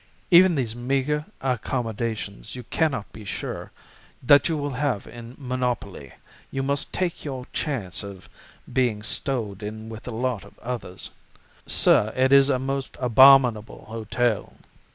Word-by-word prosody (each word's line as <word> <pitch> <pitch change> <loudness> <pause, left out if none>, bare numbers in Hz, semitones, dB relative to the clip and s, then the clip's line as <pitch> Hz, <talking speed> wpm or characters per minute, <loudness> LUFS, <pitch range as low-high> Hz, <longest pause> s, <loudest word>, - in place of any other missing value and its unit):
Even 180 0 +7
these 120 -5 -1
meager 135 +4 -1 0.2
accommodations 115 -4 -3
you 125 - -7
cannot 130 -3 -1
be 110 - -10
sure 100 - -5 0.5
that 140 +4 +6
you 160 - 0
will 145 -1 -2
have 130 -5 -1
in 120 +1 -10
monopoly; 125 - -3 0.4
you 135 - -3
must 140 +1 -1
take 180 -2 -2
your 130 -4 -5
chance 115 - -2
of 100 -2 -10 0.5
being 120 -5 +1
stowed 110 -4 -2
in 110 +1 -6
with 110 +1 -9
a - - -3
lot 120 -2 -2
of 100 - -17
others. 115 -7 -6 0.6
Sir, 110 - +4
it 130 +1 +3
is 140 0 +7
a 135 - +3
most 135 +1 -3
abominable 125 -2 +5
hotel. 115 0 -1
125 Hz, 140 wpm, -24 LUFS, 110-135 Hz, 0.6 s, Even